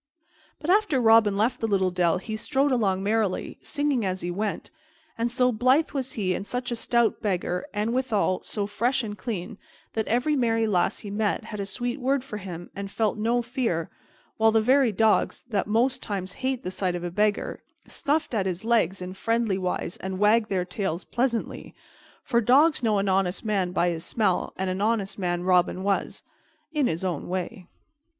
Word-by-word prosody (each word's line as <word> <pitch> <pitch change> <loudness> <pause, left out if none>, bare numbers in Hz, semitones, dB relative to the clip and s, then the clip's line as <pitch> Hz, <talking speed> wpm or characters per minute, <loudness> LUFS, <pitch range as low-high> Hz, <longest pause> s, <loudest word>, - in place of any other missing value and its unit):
But 320 - 0
after 405 -9 +3
Robin 225 -3 +5
left 235 +4 +1
the 225 - +1
little 190 -3 +2
dell 175 -1 +2
he 215 +4 -5
strode 270 +5 +1
along 195 -6 +1
merrily, 210 -2 -1
singing 290 -5 0
as 185 -1 -2
he 175 - -3
went; 205 +3 -3 0.4
and 230 +1 -1
so 250 +1 +2
blithe 255 +7 +3
was 265 -2 -3
he 190 -4 0
and 195 - -4
such 250 0 -3
a - - 0
stout 235 0 +1
beggar, 180 +1 -1
and, 215 +2 -1
withal, 225 -7 +1
so 205 -2 -2
fresh 240 +6 0
and 210 -2 -5
clean, 210 -3 -5 0.3
that 220 -1 -1
every 250 +6 +1
merry 225 -4 +2
lass 195 -1 +1
he 205 - -8
met 210 0 0
had 210 - -7
a 200 - -3
sweet 240 +6 -3
word 265 +1 +1
for 215 -5 -6
him 175 -3 -8
and 200 0 -5
felt 215 +1 0
no 235 +3 +1
fear, 235 - -2 0.5
while 225 0 +4
the 225 - +4
very 255 +2 +4
dogs, 215 +2 +2
that 205 -5 -1
most 250 +5 +1
times 195 -2 -4
hate 260 -1 -1
the 185 - -3
sight 185 -1 -1
of 175 - -5
a 175 - -3
beggar, 210 +2 0 0.3
snuffed 300 -1 -1
at 200 -4 0
his 185 +3 -4
legs 195 -6 +1
in 180 +1 -6
friendly 225 -1 0
wise 180 -1 -3
and 190 0 -5
wagged 215 +2 +3
their 185 -2 0
tails 180 -1 -3
pleasantly; 240 -2 -2 0.5
for 235 - +2
dogs 280 +7 +4
know 220 -3 +2
an 200 0 0
honest 190 +1 0
man 195 -4 0
by 175 -1 +2
his 165 -1 -3
smell, 205 -4 0
and 190 - -1
an 185 +1 -2
honest 210 -2 0
man 175 -1 -1
Robin 185 0 +2
was 200 0 -1 0.5
in 295 -4 +2
his 165 +3 -2
own 175 -6 -2
way. 185 +1 -4
215 Hz, 195 wpm, -26 LUFS, 190-240 Hz, 0.5 s, Robin